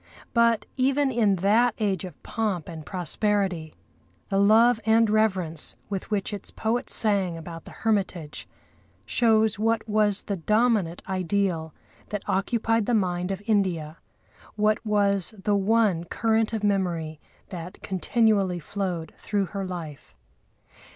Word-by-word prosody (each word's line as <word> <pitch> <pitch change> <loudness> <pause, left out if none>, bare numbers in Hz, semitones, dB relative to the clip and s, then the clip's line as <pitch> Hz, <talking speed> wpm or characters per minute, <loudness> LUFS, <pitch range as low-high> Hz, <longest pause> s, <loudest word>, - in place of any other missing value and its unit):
But, 235 -2 +3
even 270 +1 +2
in 220 -5 +3
that 230 +3 +4
age 195 -4 -1
of 175 -5 -11
pomp 205 -8 -2
and 160 -2 -7
prosperity, 185 -1 -1 0.5
the 195 -1 +1
love 220 +3 +5
and 225 +1 +4
reverence 190 -7 0 0.2
with 195 -2 -4
which 210 0 -1
its 205 - -5
poet 230 +2 -2
sang 195 -6 +1
about 165 0 -9
the - - -11
hermitage 190 -8 -1 0.6
shows 220 - +2
what 225 0 +1
was 210 -2 +2
the 200 - -3
dominant 210 -2 +1
ideal 185 -3 -1 0.3
that 210 -2 -5
occupied 225 +2 +1
the 245 - +2
mind 180 -3 0
of 195 +1 -4
India; 175 -7 0 0.6
what 215 +1 +1
was 205 -1 +1
the 205 +1 0
one 200 -4 +2
current 220 +4 +1
of 220 -2 -3
memory 175 -6 0 0.3
that 180 0 -8
continually 195 -1 +1
flowed 175 -1 -4
through 205 -2 -1
her 195 -1 -3
life. 160 - -8
200 Hz, 130 wpm, -26 LUFS, 180-220 Hz, 0.6 s, love